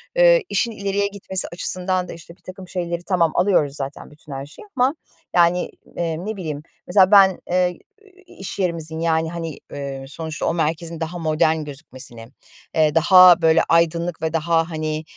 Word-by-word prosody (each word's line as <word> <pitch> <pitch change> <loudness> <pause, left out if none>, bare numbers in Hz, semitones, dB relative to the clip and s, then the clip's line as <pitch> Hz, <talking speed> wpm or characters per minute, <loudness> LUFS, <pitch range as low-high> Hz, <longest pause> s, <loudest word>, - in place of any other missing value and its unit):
eee, - - +5
işin 225 +4 0
ileriye 200 -1 -1
gitmesi 195 -2 -2
açısından 185 +1 -1
da - - -7
işte 170 +1 -13
birtakım 185 0 -11
şeyleri 175 -1 -4
tamam 170 -4 +1
alıyoruz 175 -7 +2
zaten 140 +1 -6
bütün 150 0 -15
her 135 +1 -5
şeyi 165 - -14
ama 260 +5 +2 0.4
yani, 175 +1 +3 0.3
eee, 165 -2 -2
ne 220 0 -3
bileyim 155 -5 -5 0.3
mesela 190 +2 +4
ben, 195 -2 +6
eee, 180 0 +2 0.3
i 380 -1 -22
i - - -18
iş 195 +1 -7
yerimizin 165 -3 -2
yani, 160 0 0
hani, 165 -3 -5 0.2
ııı, 135 -1 -6
sonuçta 160 +1 -5
o - - +1
merkezin 165 +1 -2
daha 165 +2 -4
modern 160 0 +1
gözükmesini, 130 -5 -9 0.5
eee, 155 -1 +3
daha 180 +1 +7
böyle 160 0 +4
aydınlık 170 0 +1
ve 160 0 -2
daha 165 +1 +1
hani, 155 -1 -3
170 Hz, 170 wpm, -21 LUFS, 155-185 Hz, 0.5 s, daha